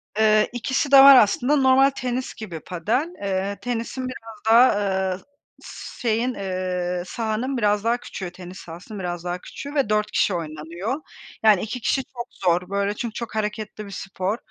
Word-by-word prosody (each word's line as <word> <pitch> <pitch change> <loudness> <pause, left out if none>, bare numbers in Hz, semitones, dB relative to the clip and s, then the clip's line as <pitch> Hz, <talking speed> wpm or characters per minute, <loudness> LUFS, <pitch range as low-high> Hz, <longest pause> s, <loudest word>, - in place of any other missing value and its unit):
Eee, 215 0 +4
ikisi 260 +3 -1
de 275 - +9
var 275 -1 +11
aslında, 245 +5 +4
normal 270 0 +5
tenis 255 -1 -4
gibi 180 -8 -7
padel, 225 - -1
eee, 195 0 -2
tenisin 245 +2 -3
biraz 225 -3 -9
daha, 240 +3 +7
ııı, 190 -1 -1 0.4
s - - -10
şeyin, 235 +2 +1
eee, 180 -3 -3
sahanın 230 +6 -2
biraz 210 -2 +1
daha 230 +1 +2
küçüğü, 185 -6 -7
tenis 180 +1 -10
sahasının 175 +5 -9
biraz 175 -1 -4
daha 175 0 -3
küçüğü 285 +1 -8
ve 275 -7 +1
4 210 0 +1
kişi 200 - +2
oynanıyor. 170 - -4 0.4
Yani, 210 -4 +6
2 250 +3 -4
kişi 265 +5 +1
çok 245 -2 -8
zor, 180 0 0
böyle, 200 +1 0
çünkü 235 -1 -4
çok 230 -1 -6
hareketli 210 0 -3
bir 200 - -10
spor. 195 +2 -3
215 Hz, 170 wpm, -23 LUFS, 185-245 Hz, 0.4 s, var